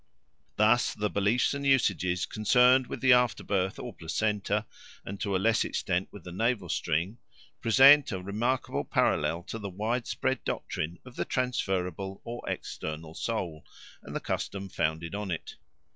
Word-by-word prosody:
Thus 110 +3 +3
the 105 -1 -1
beliefs 105 +7 +2
and 140 0 -4
usages 95 -10 +2
concerned 125 +6 +4
with - - -6
the 130 -2 +6
afterbirth 100 -6 +1
or - - -6
placenta, 105 +4 -1 0.4
and 100 0 -7
to 100 -2 -1
a - - +4
less 110 +4 +2
extent 90 0 -1
with 100 - -11
the 90 - -8
navel 105 -1 0
string, 85 +10 -1 0.4
present 135 +5 +7
a 95 - -3
remarkable 110 +7 -1
parallel 85 +2 +1
to 115 - -6
the 100 -2 -5
widespread 120 +6 -2
doctrine 85 +3 -3
of 125 -1 -13
the - - -1
transferable 95 -6 -2
or 120 +1 -6
external 80 +1 -5
soul 85 -7 -3 0.4
and - - -9
the - - 0
customs 100 -1 -4
founded 80 +3 -1
on 100 -1 -4
it. 85 -3 -5
100 Hz, 150 wpm, -29 LUFS, 90-120 Hz, 0.4 s, present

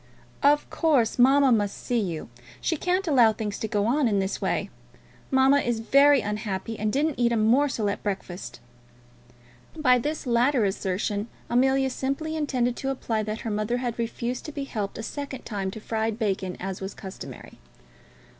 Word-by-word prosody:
"Of 290 +1 +4
course, 275 -9 +2
mamma 270 +2 +6
must 205 -3 +1
see 245 -1 -1
you. 175 -7 -3 0.3
She 330 - 0
can't 365 +4 0
allow 245 -7 +5
things 210 -2 -4
to 220 - -2
go 205 -1 0
on 265 +4 +2
in 205 -3 +1
this 195 0 -1
way. - - -1 0.6
Mamma 265 +1 +5
is 240 -4 -1
very 275 +5 +5
unhappy, 210 +1 -4
and 215 0 0
didn't 290 +2 0
eat 240 -1 +3
a 235 - +2
morsel 230 +1 +2
of 200 - -2
breakfast." 190 -3 -5 1.2
By 255 -5 +4
this 295 +5 -3
latter 245 0 +3
assertion 200 +2 -1 0.2
Amelia 265 +2 +3
simply 275 +5 -2
intended 255 -5 0
to 270 - -3
imply 230 -5 -1
that 215 +1 -4
her 225 - -3
mother 215 +3 -1
had 240 -2 -3
refused 235 +2 -3
to 305 - -5
be 285 -1 -4
helped 210 -7 -4
a 225 - -5
second 280 +2 -6
time 200 -3 -3
to 205 - -7
fried 220 0 -2
bacon, 195 -5 -2
as 190 0 -5
was 190 +1 -5
customary. 190 -1 -10
235 Hz, 175 wpm, -26 LUFS, 210-270 Hz, 1.2 s, mamma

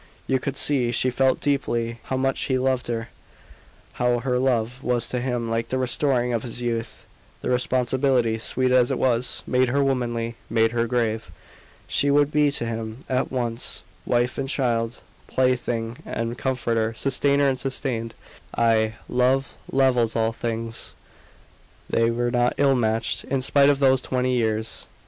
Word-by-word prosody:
You 130 - +1
could 140 +1 -4
see 130 -5 +2
she 130 +2 +2
felt 130 +1 +2
deeply 120 -5 -1
how 130 - -2
much 135 0 0
he 130 - +1
loved 130 -1 0
her 115 -1 -3 0.9
how 125 0 +3
her 125 +1 0
love 125 -1 0
was 120 -1 +1
to 125 - -1
him 120 -2 -2
like 115 0 -2
the 130 - -1
restoring 125 -1 +1
of 115 - 0
his 120 0 -3
youth. 115 -1 -3 0.4
The - - -1
responsibility, 125 -1 +1
sweet 130 +3 +1
as 125 -1 +4
it - - 0
was, 125 -1 0
made 130 0 +2
her 140 +3 +2
womanly, 120 -3 -1
made 115 0 +2
her 120 0 0
grave. 115 -2 -1 0.6
She 145 - +1
would 145 0 +3
be 150 -1 +3
to 140 -4 -2
him 115 +2 -5
at 130 0 0
once 120 -3 -2 0.2
wife 120 +1 0
and 135 - -2
child, 120 -4 -1 0.3
plaything 120 -2 0
and 115 +1 -3
comforter, 115 -4 -1
sustainer 140 +3 +2
and 130 -2 0
sustained. 125 -4 -3 0.4
Ay, 110 -1 +2
love 130 +2 +1 0.2
levels 125 -4 +2
all 115 0 +1
things. 115 0 -3 0.9
They 115 0 +2
were 120 +1 0
not 120 0 +2
ill 140 -1 +4
matched, 110 -2 0
in 135 -1 -1
spite 140 +1 +4
of 145 - +3
those 130 -1 +3
twenty 130 0 -1
years. 110 -2 -1
125 Hz, 160 wpm, -24 LUFS, 115-130 Hz, 0.9 s, as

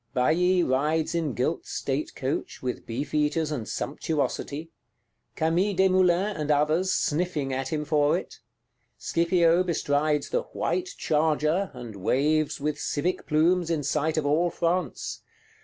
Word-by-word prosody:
Bailly 180 +8 +3
rides 150 +5 +1
in 160 -6 -1
gilt 130 +7 -1
state 140 +2 -3
coach, 135 0 -3
with 125 -1 -4
beefeaters 150 +5 -1
and 125 -8 -3
sumptuosity; 150 +1 -3 0.6
Camille 175 +6 +1
Desmoulins, 185 +1 +3
and 150 -1 -2
others, 155 +5 +2
sniffing 155 -6 0
at 130 0 -2
him 150 -1 -1
for 150 -1 +3
it: - - -8 0.6
Scipio 170 0 +2
bestrides 150 -4 0
the - - +1
"white 370 0 -1
charger," 155 +4 +1
and 120 -4 -8
waves 150 +9 +1
with 150 +1 -2
civic 175 +5 -2
plumes 170 +3 +2
in 160 -3 0
sight 155 +2 0
of 155 - 0
all 160 +5 +2
France. 175 +2 -2
155 Hz, 130 wpm, -26 LUFS, 145-175 Hz, 0.6 s, Bailly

